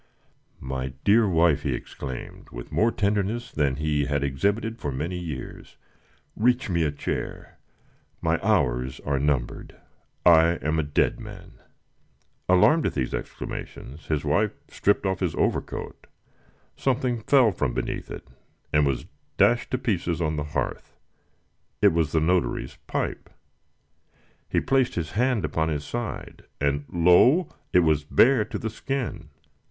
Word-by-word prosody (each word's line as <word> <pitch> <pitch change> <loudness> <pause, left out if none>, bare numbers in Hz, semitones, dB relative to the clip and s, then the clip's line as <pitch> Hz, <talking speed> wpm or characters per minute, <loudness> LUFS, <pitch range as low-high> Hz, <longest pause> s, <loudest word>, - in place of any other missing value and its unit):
"My 65 0 -4
dear 105 +1 +4
wife!" 80 -4 +3
he 70 -5 -1
exclaimed, 65 +1 -8
with - - -9
more 115 +2 +3
tenderness 105 +3 -1
than 70 -3 +1
he 75 0 0
had 70 0 -1
exhibited 100 - -1
for 70 - -3
many 80 +7 -3
years, 80 -7 -7 0.6
"reach 120 -1 +1
me 85 -1 +1
a 75 -2 +1
chair. 70 - -5 0.6
My 80 0 +1
hours 65 - +1
are 70 -2 -1
numbered. 70 -4 -1 0.5
I 85 -1 +7
am 80 +2 +1
a 75 -2 -2
dead 75 - +1
man!" - - -11 0.9
Alarmed 145 - +5
at - - -4
these 65 -4 -1
exclamations, 70 +6 -7
his 75 -1 -1
wife 100 +8 +2 0.2
stripped 100 0 +1
off 95 -1 0
his 90 -5 -1
overcoat. - - -2 0.7
Something 125 -2 0
fell 125 0 +4
from 75 -8 -2
beneath - - -3
it, - - -8 0.5
and 75 -1 +4
was 70 -2 -1 0.3
dashed 120 0 +3
to 130 - 0
pieces 90 -9 -1
on 80 -2 0
the 75 - -2
hearth. - - -3 0.8
It - - +5
was 80 -2 +1
the 80 - +2
notary's 85 +2 0
pipe. - - -3 1.2
He - - +2
placed 135 -1 +1
his 80 -3 -3
hand 120 -4 +1
upon 80 +1 -1
his 75 -2 -2
side, 120 +4 -6
and 70 0 0
lo! 90 - +5 0.2
it 90 - +5
was 80 -3 +2
bare 120 - +4
to 110 0 -5
the 110 +1 -4
skin. 125 - -4
85 Hz, 145 wpm, -25 LUFS, 75-110 Hz, 1.2 s, I